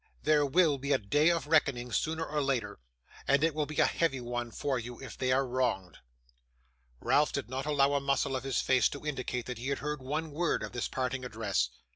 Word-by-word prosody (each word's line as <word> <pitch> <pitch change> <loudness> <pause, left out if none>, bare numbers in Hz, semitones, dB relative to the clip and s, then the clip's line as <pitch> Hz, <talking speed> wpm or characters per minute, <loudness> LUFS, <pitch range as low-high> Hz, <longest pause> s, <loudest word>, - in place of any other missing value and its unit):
There 150 -2 +3
will 155 -1 +3
be 140 +2 -3
a - - +4
day 145 +10 +2
of 170 -3 0
reckoning 140 -6 +2
sooner 160 +7 -1
or 150 0 -1
later, 125 -7 -1 0.5
and 140 +2 +3
it 165 -1 +3
will 150 -1 -1
be 150 - -7
a - - +5
heavy 160 -6 0
one 120 0 -4
for 130 +3 -2
you 120 +1 -8
if 135 - -8
they 130 -1 0
are 135 +1 +3
wronged.' 120 - -1 1.0
Ralph 150 +1 +3
did 135 -3 -4
not 135 +2 -3
allow 140 -1 +3
a 140 - +1
muscle 140 0 0
of 130 - -3
his 135 -3 0
face 130 -1 +3
to 145 +1 -8
indicate 130 -4 -3
that 125 -3 -6
he 125 - -5
heard 145 +1 -2
one 150 +4 -3
word 170 -2 0
of 105 - -5
this 120 -1 -2
parting 130 0 -2
address. 105 - -1
135 Hz, 215 wpm, -30 LUFS, 125-150 Hz, 1.0 s, a